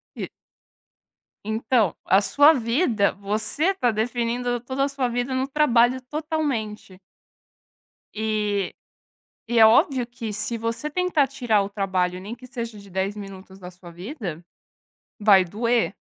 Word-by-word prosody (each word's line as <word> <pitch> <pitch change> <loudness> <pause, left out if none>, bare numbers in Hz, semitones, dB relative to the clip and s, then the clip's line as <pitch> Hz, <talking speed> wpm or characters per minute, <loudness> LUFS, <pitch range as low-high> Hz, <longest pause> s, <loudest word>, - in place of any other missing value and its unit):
E - - -5 1.1
então, 220 -1 +1
a 190 +2 +4
sua 285 +10 +5
vida, 230 - +1
você 210 - 0
está 375 -11 0
definindo 240 +2 -1
toda 260 +3 -2
a 280 - +2
sua 275 -2 -1
vida 245 +2 -2
no 260 +1 0
trabalho 260 -4 +3
totalmente. 255 - -4 1.1
E 210 -3 -1 0.7
e 235 0 +2
é 220 - +9
óbvio 245 +2 +3
que 235 -3 -6
se 215 +3 -3
você 230 +6 -3
tentar 335 -3 +1
tirar 240 -6 +1
o 200 - -3
trabalho, 185 -3 -1
nem 200 +5 -7
que 245 +2 -12
seja 235 -3 -6
de 200 0 -14
10 190 +2 -2
minutos 195 -2 -10
da 180 -1 -9
sua 180 -1 -14
vida, 180 - -7 0.8
vai 205 -3 +6
doer, 230 +4 0
230 Hz, 140 wpm, -24 LUFS, 200-255 Hz, 1.1 s, é